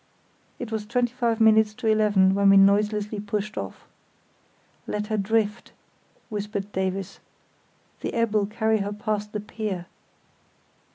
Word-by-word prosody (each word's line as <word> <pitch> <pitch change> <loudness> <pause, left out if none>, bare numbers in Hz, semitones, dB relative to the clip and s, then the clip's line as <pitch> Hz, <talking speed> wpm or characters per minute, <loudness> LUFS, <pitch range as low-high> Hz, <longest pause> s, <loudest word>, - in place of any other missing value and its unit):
It 240 -2 -6
was 215 -1 -3
twenty 240 +1 0
five 235 -2 0
minutes 220 -1 +4
to 250 - -8
eleven 210 -3 +4
when 200 0 +4
we 195 - +7
noiselessly 210 +1 +3
pushed 210 +1 -3
off. 95 - -6 1.0
"Let 210 0 -2
her - - +3
drift," 210 +2 -1 0.6
whispered 205 -1 -4
Davies, 190 0 -3 0.8
"the - - -3
ebb'll 215 -3 +1
carry 220 +1 +1
her 200 +1 -3
past 210 0 -3
the 210 - -3
pier." 210 -4 -5
210 Hz, 130 wpm, -25 LUFS, 200-220 Hz, 1.0 s, we